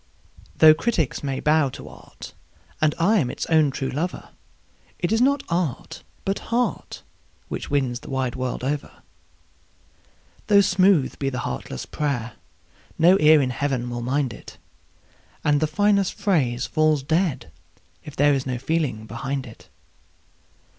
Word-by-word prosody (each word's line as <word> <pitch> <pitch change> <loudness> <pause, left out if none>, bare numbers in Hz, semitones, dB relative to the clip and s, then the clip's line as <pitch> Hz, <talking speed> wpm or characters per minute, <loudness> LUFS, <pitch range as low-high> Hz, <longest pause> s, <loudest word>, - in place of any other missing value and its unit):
Though 155 -1 +8
critics 165 - -1
may 135 -2 -3
bow 150 -2 +2
to - - -10
art, - - -12 0.5
and 155 -1 +2
I 200 +6 +3
am 130 -7 0
its - - -4
own 155 -2 +4
true 135 0 -4
lover, 165 +7 -4 0.7
It 175 - -2
is 225 +1 +2
not 280 +2 +2
art, 170 -7 -3 0.2
but 195 0 -1
heart, 240 +2 -2 0.5
which - - -5
wins 130 -4 0
the - - -12
wide 130 -3 -1
world 130 -1 -4
over. 145 +2 -3 1.5
Though 205 -1 +6
smooth 185 -6 +2
be 135 - 0
the 125 - -5
heartless 65 - -5
prayer, 125 -6 -3 0.6
no 180 +4 +5
ear 150 -1 +6
in 130 - -1
Heaven 125 -2 -2
will 120 0 -4
mind 130 +1 -1
it, - - -13 0.9
And 145 -1 +3
the 155 - +1
finest 200 +4 +1
phrase 145 - 0
falls 155 -3 +1
dead 160 -1 -1 0.5
if 150 - -10
there 145 +1 +4
is 135 -1 -2
no 125 -1 -2
feeling 135 -5 -2
behind 130 +5 -4
it. 115 - -14
145 Hz, 145 wpm, -23 LUFS, 130-170 Hz, 1.5 s, Though